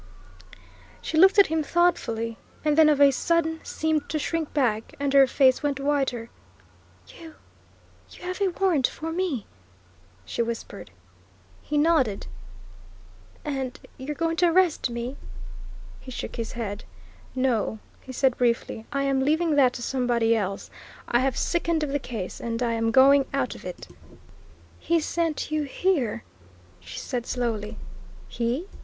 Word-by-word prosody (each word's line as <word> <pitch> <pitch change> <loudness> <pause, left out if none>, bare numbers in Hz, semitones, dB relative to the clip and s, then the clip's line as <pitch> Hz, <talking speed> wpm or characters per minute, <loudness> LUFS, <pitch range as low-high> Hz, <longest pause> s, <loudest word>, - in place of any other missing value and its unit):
She - - -5
looked 380 +6 +6
at 400 - +8
him 320 0 0
thoughtfully, 230 -10 0 0.3
and 300 -1 +3
then 315 0 +6
of 295 -2 +3
a 280 -1 +7
sudden 320 +3 0
seemed 315 -2 -1
to 310 - -1
shrink 320 +1 -2
back, 235 -2 0
and 280 -1 -1
her 275 -1 +7
face 260 0 +4
went 285 -2 -1
whiter. 270 -5 -1 0.8
"You 325 -2 -12 0.7
you - - -14
have 365 +2 -4
a 395 - +4
warrant 350 -7 +2
for 325 +1 -6
me!" 325 - -2 0.8
she - - -2
whispered. 230 -3 -5 0.7
He 300 - -2
nodded. 290 -10 +2 1.2
"And 270 -3 -3 0.2
you're 285 +3 -4
going 330 +2 -1
to 355 - +4
arrest 340 -5 +3
me?" 235 +3 -5 0.8
He - - -12
shook 250 - -6
his 230 -1 -4
head. 215 -3 -4 0.5
"No," 250 -4 0 0.2
he 260 - -10
said 260 0 +2
briefly. 235 -2 0
"I 275 0 0
am 275 -1 +1
leaving 315 +3 +2
that 260 -3 +5
to 240 - -6
somebody 240 -3 +1
else. 200 -2 -3 0.4
I 240 - +2
have 260 -1 0
sickened 335 -2 0
of 300 - -2
the 285 - 0
case, 225 -8 -6
and 230 +1 -2
I'm 230 -1 0
going 270 +3 +6
out 260 -3 0
of - - -12
it." 180 - -7 0.9
"He 335 0 +1
sent 325 -1 -2
you 310 0 +1
here," 275 - 0 0.6
she 85 -1 -10
said 245 -1 -4
slowly. 225 -4 -2 0.5
"He?" 240 +8 -2
275 Hz, 150 wpm, -25 LUFS, 235-315 Hz, 1.2 s, at